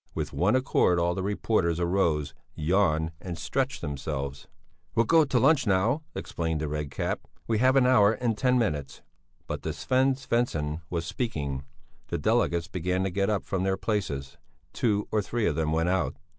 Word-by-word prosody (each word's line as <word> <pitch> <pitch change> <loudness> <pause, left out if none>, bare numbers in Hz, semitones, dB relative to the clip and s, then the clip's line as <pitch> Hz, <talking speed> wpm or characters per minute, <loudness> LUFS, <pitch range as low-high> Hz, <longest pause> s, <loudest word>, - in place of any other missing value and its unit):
With - - -3
one 100 +7 +2
accord 130 -8 +3
all 85 0 +2
the 95 - -3
reporters 95 -4 0
arose, 85 -5 +1 0.2
yawned 80 -1 +1
and 90 -2 -5
stretched 130 - -2
themselves. 70 -1 -4 0.5
"We'll 115 - +4
go 160 +6 +5
to 135 -3 0
lunch 140 -1 +4
now," 105 +10 +2
explained 80 -2 -2
the 75 - -2
Red 75 -1 -3
Cap. - - -2 0.3
"We 110 -2 0
have 130 +2 +4
an 135 -2 +5
hour 110 -5 +5
and 115 0 -1
ten 125 +3 +2
minutes." 75 - -2 0.4
But - - -5
Sven 130 +1 +1
Svensson 100 - -1
was 85 -1 -2
speaking. 70 - -3 0.4
The - - -2
delegates 85 -1 +1
began 90 +1 -1
to 95 - -1
get 100 +2 0
up 105 -2 0
from 95 -2 -2
their 95 0 +1
places; 75 -12 -3 0.4
two 105 -3 0
or 110 - +2
three 115 +2 -2
of 85 - +2
them 80 -1 0
went 80 +2 +1
out. 95 0 0
95 Hz, 175 wpm, -27 LUFS, 80-115 Hz, 0.5 s, go